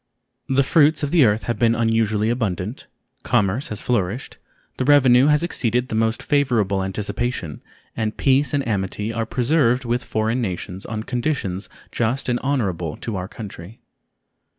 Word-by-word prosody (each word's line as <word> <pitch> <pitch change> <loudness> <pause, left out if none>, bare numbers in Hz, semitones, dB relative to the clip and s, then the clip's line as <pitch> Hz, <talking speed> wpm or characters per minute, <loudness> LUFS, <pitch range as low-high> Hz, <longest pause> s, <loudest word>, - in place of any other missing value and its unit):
The 135 +1 +3
fruits 155 +2 +3
of 145 - -1
the 165 -6 +5
earth 105 0 +2
have 120 - -3
been 115 -1 +3
unusually 115 -1 +1
abundant, 110 -2 -3 0.3
commerce 115 +2 +1
has 105 - -6
flourished, 115 0 -2 0.4
the - - 0
revenue 130 -2 +5
has 150 +1 +3
exceeded 125 -6 0
the - - -5
most 110 +1 0
favorable 115 -10 +1
anticipation, 100 - -3 0.3
and 110 -1 -2
peace 135 0 +2
and 140 -2 -1
amity 105 +1 -2
are 115 0 -2
preserved 125 0 +1
with 120 +1 -1
foreign 110 +2 -1
nations 95 -2 -5
on 110 -1 -4
conditions 120 -7 -2 0.2
just 120 +4 -1
and 120 0 +1
honorable 95 - -1
to 115 - -5
our 90 0 -4
country. 105 -1 -9
115 Hz, 150 wpm, -22 LUFS, 105-130 Hz, 0.4 s, the